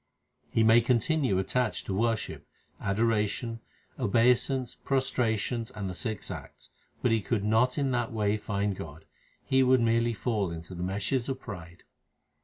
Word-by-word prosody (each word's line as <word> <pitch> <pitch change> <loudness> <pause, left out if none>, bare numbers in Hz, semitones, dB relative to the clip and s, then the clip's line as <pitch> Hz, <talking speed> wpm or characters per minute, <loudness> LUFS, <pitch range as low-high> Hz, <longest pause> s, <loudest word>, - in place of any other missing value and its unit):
He 115 - +2
may 115 +1 +6
continue 125 - +2
attached 110 +5 0
to 95 - -3
worship, 115 +2 -1 0.3
adoration, 110 +2 0 0.4
obei 115 +4 +4
sance, 130 0 -3
prostrations, 120 -3 0
and 100 -2 -5
the 90 - -4
six 110 +2 -4
acts; - - -10 0.3
But 125 - +3
he 115 -1 +3
could 105 0 -1
not 115 +5 +2
in 140 -2 +1
that 120 -2 0
way 105 -2 +1
find 100 -1 -1
God; 80 -2 -9 0.4
he 130 0 +3
would 130 0 +5
merely 115 0 +2
fall 105 -4 -1
into 85 +2 -7
the 90 - -6
meshes 100 +8 -1
of 130 -1 -2
pride. 85 -7 -9
115 Hz, 155 wpm, -29 LUFS, 100-125 Hz, 0.4 s, may